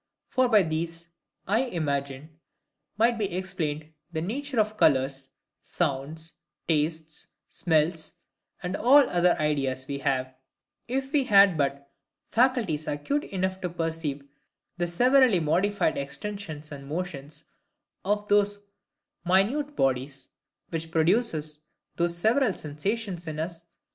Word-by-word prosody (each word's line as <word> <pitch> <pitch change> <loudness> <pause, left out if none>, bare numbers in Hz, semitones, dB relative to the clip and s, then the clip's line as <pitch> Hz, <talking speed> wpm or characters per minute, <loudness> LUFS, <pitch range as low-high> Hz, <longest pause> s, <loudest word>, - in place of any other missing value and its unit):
For 255 -1 +2
by 210 -4 +6
these, 165 +1 -4 0.4
I 210 +4 +3
imagine, 150 - -3 0.6
might 230 +1 +3
be 205 -3 -1
EXPLAINED 160 -5 -3 0.2
the 160 -2 -2
nature 260 - -2
of 215 0 +1
colours, 135 -5 +2 0.3
sounds, 160 +1 -3 0.3
tastes, 155 0 -1 0.2
smells, 160 -1 0 0.5
and 180 +2 -2
ALL 280 +3 +6
OTHER 175 0 +3
IDEAS 135 -4 -1
WE 140 0 -4
HAVE, 130 -1 -1 0.5
if 265 +2 -2
we 290 -4 +2
had 200 -5 +6
but 140 -1 -2 0.4
faculties 230 - +2
acute 215 - -1
enough 190 0 -2
to 180 - -2
perceive 160 -4 -3 0.5
the 175 -1 -1
severally 245 +3 +4
modified 175 +2 +1
extensions 155 +1 -6
and 140 -1 -8
motions 150 -2 -5 0.6
of 205 +1 0
these 205 0 +3 0.7
minute 225 +12 +2
bodies, 135 +1 -1 0.4
which 165 -1 -4
produce 160 -3 +1 0.4
those 170 0 0
several 220 +4 +3
sensations 175 +4 -3
in 155 -1 -4
us. 165 +1 -5
170 Hz, 120 wpm, -27 LUFS, 150-205 Hz, 0.7 s, by